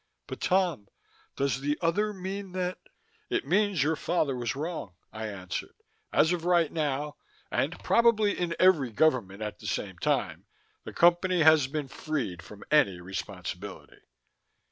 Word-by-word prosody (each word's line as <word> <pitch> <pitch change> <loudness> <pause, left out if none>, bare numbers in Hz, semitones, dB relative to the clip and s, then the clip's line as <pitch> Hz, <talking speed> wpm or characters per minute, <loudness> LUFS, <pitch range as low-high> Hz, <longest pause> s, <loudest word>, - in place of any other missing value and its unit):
But, - - -8
Tom, 180 - +1 0.5
does 135 -2 0
the 145 +1 0
other 205 +6 +1
mean 190 0 -6
that 185 0 -2 0.3
" - - -38
"It - - -1
means 190 -1 +2
your 160 +2 +1
father 155 -4 0
was 120 -1 -2
wrong," 150 - -5 0.2
I 110 0 -4
answered. 95 -3 -6 0.4
"As 160 - +4
of 170 -2 -3
right 175 -3 +3
now 150 -1 -2 0.3
and - - 0
probably 220 -3 +4
in 170 -2 -2
every 175 -9 +5
government 110 -6 +1
at 105 - -5
the - - -8
same - - -3
time - - -1 0.4
the - - -6
Company 175 +1 +3
has 155 -3 +6
been 145 0 -3
freed 130 - -3
from 100 +4 -12
any 100 -12 +4
responsibility." 90 0 -7
155 Hz, 150 wpm, -28 LUFS, 125-180 Hz, 0.5 s, has